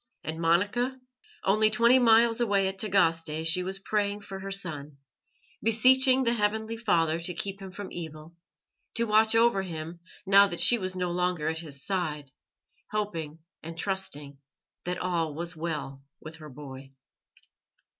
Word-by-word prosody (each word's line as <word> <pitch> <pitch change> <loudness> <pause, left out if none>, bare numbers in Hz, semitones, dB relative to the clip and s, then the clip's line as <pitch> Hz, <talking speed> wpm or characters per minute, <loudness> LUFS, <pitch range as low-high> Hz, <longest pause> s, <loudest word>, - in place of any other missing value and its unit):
And 160 +2 -5
Monica? 205 +10 +1 0.4
Only 215 +3 +3
twenty 235 +4 +4
miles 230 0 +4
away 200 -4 +2
at 190 0 -5
Tagaste 165 -6 +1
she 175 +3 +1
was 190 +1 -3
praying 205 +1 -2
for 195 -1 -8
her 195 +1 -7
son, 150 -7 -4 0.6
beseeching 260 +4 +5
the 235 -1 +2
Heavenly 220 0 -1
Father 170 -8 +1
to 175 +1 -5
keep 195 0 -4
him 190 - -8
from 200 +1 -8
evil, 160 -1 -8 0.6
to 235 - +1
watch 220 0 +3
over 230 -3 +4
him 165 -2 -7 0.3
now 200 +1 +6
that 175 -3 -6
she 240 - +6
was 185 -1 -3
no 180 -1 -2
longer 180 -3 -1
at 160 0 -3
his 145 -5 -7
side, 155 -8 -3 0.6
hoping 165 -7 -4 0.2
and 165 +1 -9
trusting 150 -7 -4 0.5
that 180 0 -2
all 165 -4 -2
was 170 +2 -5
well 155 -4 -5 0.2
with 160 +1 -11
her 155 -1 -11
boy. 135 -1 -11
185 Hz, 155 wpm, -27 LUFS, 160-210 Hz, 0.6 s, now